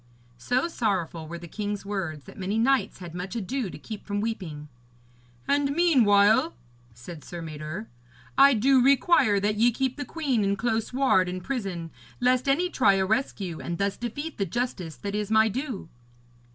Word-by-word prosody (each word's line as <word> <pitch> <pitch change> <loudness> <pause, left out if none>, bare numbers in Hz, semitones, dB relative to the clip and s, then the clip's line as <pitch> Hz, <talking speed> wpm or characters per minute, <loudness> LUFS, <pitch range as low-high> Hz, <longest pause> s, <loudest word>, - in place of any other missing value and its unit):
So 250 - 0
sorrowful 185 - -2
were 170 +2 -6
the 170 0 -10
king's 205 +2 -4
words 180 -8 -4
that - - -13
many 195 +3 -1
knights 265 +3 +2
had 175 -3 -9
much 180 +4 -5
ado 235 +1 -2
to - - -9
keep 210 +7 -8
from 205 -1 -3
weeping. 180 -9 -4 0.8
'And 280 0 +1
meanwhile,' 215 - +4 0.4
said 150 +7 -10
Sir 175 - -8
Mador, 155 +5 -6 0.5
'I 275 +1 +7
do 260 +4 +4
require 260 -5 +4
that 210 +1 0
ye 235 +3 +5
keep 260 +2 -2
the 290 - -3
queen 275 -6 -1
in 200 0 +1
close 225 +1 -1
ward 250 -9 +3
and 180 0 -5
prison, 195 -11 -4 0.3
lest 255 +2 +2
any 330 +7 +2
try 255 - +3
a 190 0 +1
rescue, 195 - -1
and 170 0 -4
thus 200 +1 0
defeat 285 +6 -5
the 195 - +1
justice 185 -6 -3
that 200 0 -6
is 210 -1 -2
my 220 0 +5
due.' 245 - -4
210 Hz, 175 wpm, -26 LUFS, 185-255 Hz, 0.8 s, I